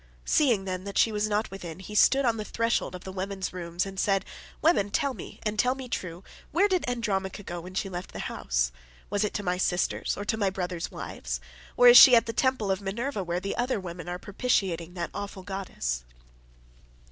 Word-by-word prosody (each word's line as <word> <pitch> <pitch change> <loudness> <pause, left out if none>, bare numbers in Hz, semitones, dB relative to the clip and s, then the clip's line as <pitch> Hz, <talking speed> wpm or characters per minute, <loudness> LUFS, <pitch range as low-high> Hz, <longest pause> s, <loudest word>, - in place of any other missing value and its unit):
Seeing, 235 -10 +3
then, 185 -1 -3
that 200 - -5
she 225 - +4
was 210 0 0
not 210 0 0
within, 175 -4 -7
he 190 +3 -9
stood 270 +6 +5
on 230 -2 +2
the 215 - -3
threshold 230 -3 -1
of 180 - -9
the 190 - -7
women's 190 0 -4
rooms 175 0 -2
and 195 -1 -6
said, 195 -1 +2 0.3
"Women, 310 - +3
tell 280 +4 0
me, - - -10
and 210 -1 -2
tell 250 +3 +3
me 265 -1 -7
true, 180 -6 -5 0.3
where 380 +5 +4
did 370 -9 0
Andromache 205 -5 -2
go 175 0 -5
when 185 +2 -10
she 195 - -1
left 180 -1 -6
the - - -8
house? - - -1 0.4
Was 205 0 +1
it 210 - -2
to 205 - -2
my 180 -1 0
sisters, 180 -1 0
or 205 - -4
to 220 +1 0
my 200 -3 +2
brothers' 180 -3 -3
wives? - - -5 0.4
or 245 - +7
is 245 0 +11
she 250 - +10
at 230 - +5
the 230 - -4
temple 240 -4 +1
of 190 +1 -1
Minerva 210 +3 -3
where 175 0 -2
the 195 +2 -3
other 245 -2 0
women 175 -1 -7
are 175 - -3
propitiating 185 -5 -1
the 170 -1 -3
awful 200 -2 -6
goddess?" 185 - -3
195 Hz, 215 wpm, -27 LUFS, 180-230 Hz, 0.4 s, is